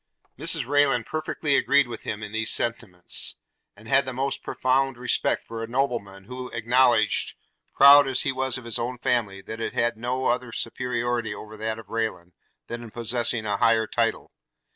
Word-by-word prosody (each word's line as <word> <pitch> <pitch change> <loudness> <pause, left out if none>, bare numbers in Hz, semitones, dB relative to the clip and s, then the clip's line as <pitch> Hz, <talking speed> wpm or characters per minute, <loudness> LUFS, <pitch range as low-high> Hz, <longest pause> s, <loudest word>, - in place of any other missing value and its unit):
Mrs - - -1
Rayland 140 -3 +2
perfectly 155 -2 -1
agreed 140 0 +4
with 115 -2 -7
him 105 0 -5
in 105 - -6
these 110 0 -1
sentiments; 105 -7 -1 0.4
and 105 +2 -15
had 135 +2 +3
the 130 - -3
most 135 +2 -2
profound 135 0 0
respect 125 0 0
for 115 0 -7
a 115 - -4
nobleman, 115 -6 -2
who 125 +4 -7
acknowledged, 120 -1 +3 0.4
proud 140 0 +8
as 130 -1 0
he - - +1
was 130 0 -2
of 130 - -10
his 115 - -3
own 125 +2 -3
family, 115 -6 -1
that 110 +3 -8
it - - -3
had 115 -1 +1
no 125 +3 -2
other 125 0 0
superiority 120 -1 -2
over 110 0 -10
that 110 +1 -3
of 110 -3 -12
Rayland, 110 -6 -3 0.3
than 120 0 -6
in 120 - -9
possessing 120 0 -1
a 100 -1 0
higher 115 +1 +3
title. - - -1
120 Hz, 180 wpm, -25 LUFS, 110-130 Hz, 0.4 s, proud